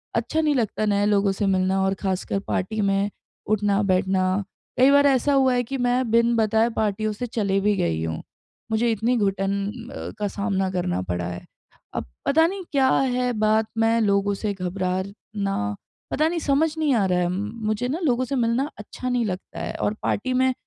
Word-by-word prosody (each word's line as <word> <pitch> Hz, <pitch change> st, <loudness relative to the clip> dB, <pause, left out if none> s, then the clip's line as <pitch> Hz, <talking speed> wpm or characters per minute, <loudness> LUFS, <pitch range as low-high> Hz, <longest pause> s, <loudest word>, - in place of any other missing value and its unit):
अच्छा 240 Hz, +8 st, 0 dB
नहीं 300 Hz, -2 st, +2 dB
लगता 215 Hz, -2 st, 0 dB
नए 205 Hz, 0 st, +2 dB
लोगों 200 Hz, -1 st, +3 dB
से 205 Hz, +1 st, -1 dB
मिलना 190 Hz, 0 st, +2 dB
और 190 Hz, 0 st, +2 dB
ख़ासकर 190 Hz, 0 st, -1 dB
पार्टी 215 Hz, +4 st, -2 dB
में 195 Hz, +1 st, +1 dB, 0.4 s
उठना-बैठना। 195 Hz, -2 st, +2 dB, 0.6 s
कई 260 Hz, +2 st, +7 dB
बार 285 Hz, 0 st, +5 dB
ऐसा 275 Hz, +1 st, +3 dB
हुआ 265 Hz, -2 st, +4 dB
है 245 Hz, -, +1 dB
कि 270 Hz, +3 st, -4 dB
मैं 245 Hz, -1 st, +1 dB
बिन 235 Hz, +1 st, +4 dB
बताए 220 Hz, +1 st, +3 dB
पार्टियों 215 Hz, 0 st, 0 dB
से 245 Hz, +4 st, -4 dB
चली 200 Hz, -4 st, 0 dB
भी 205 Hz, +1 st, +2 dB
गई 80 Hz, -1 st, 0 dB
हूँ। 80 Hz, -1 st, -3 dB, 0.5 s
मुझे 230 Hz, +1 st, +2 dB
इतनी 230 Hz, +3 st, +1 dB
घुटन 195 Hz, -1 st, 0 dB, 0.4 s
अ, -, -, -6 dB
का 205 Hz, -, 0 dB
सामना 195 Hz, -1 st, -1 dB
करना 180 Hz, -, -1 dB
पड़ा 90 Hz, -1 st, -3 dB
है। 90 Hz, 0 st, -7 dB, 0.5 s
अब -, -, -2 dB, 0.2 s
पता 320 Hz, +3 st, +4 dB
नहीं 385 Hz, +1 st, -5 dB
क्या 265 Hz, -1 st, +4 dB
है 250 Hz, -1 st, +1 dB
बात 215 Hz, 0 st, +3 dB
में 225 Hz, +1 st, +3 dB
लोगों 200 Hz, -1 st, +2 dB
से 205 Hz, 0 st, -2 dB
घबराना 190 Hz, -, -3 dB, 0.4 s
पता 310 Hz, +2 st, +2 dB
नहीं 345 Hz, -, -2 dB
समझ 310 Hz, +2 st, +1 dB
नहीं 300 Hz, -4 st, +2 dB
आ 200 Hz, -4 st, +2 dB
रहा 180 Hz, -1 st, +1 dB
है 175 Hz, -, +1 dB
मुझे 215 Hz, +4 st, -2 dB
न 310 Hz, +6 st, -2 dB
लोगों 255 Hz, -4 st, +2 dB
से 275 Hz, +2 st, -3 dB
मिलना 240 Hz, +4 st, +1 dB
अच्छा 255 Hz, +4 st, -6 dB
नहीं 245 Hz, -2 st, +1 dB
लगता 185 Hz, -3 st, -5 dB
है। -, -, -4 dB
और 205 Hz, -, +1 dB
पार्टी 255 Hz, +5 st, 0 dB
में 260 Hz, 0 st, +3 dB
215 Hz, 190 wpm, -24 LUFS, 195-250 Hz, 0.6 s, कई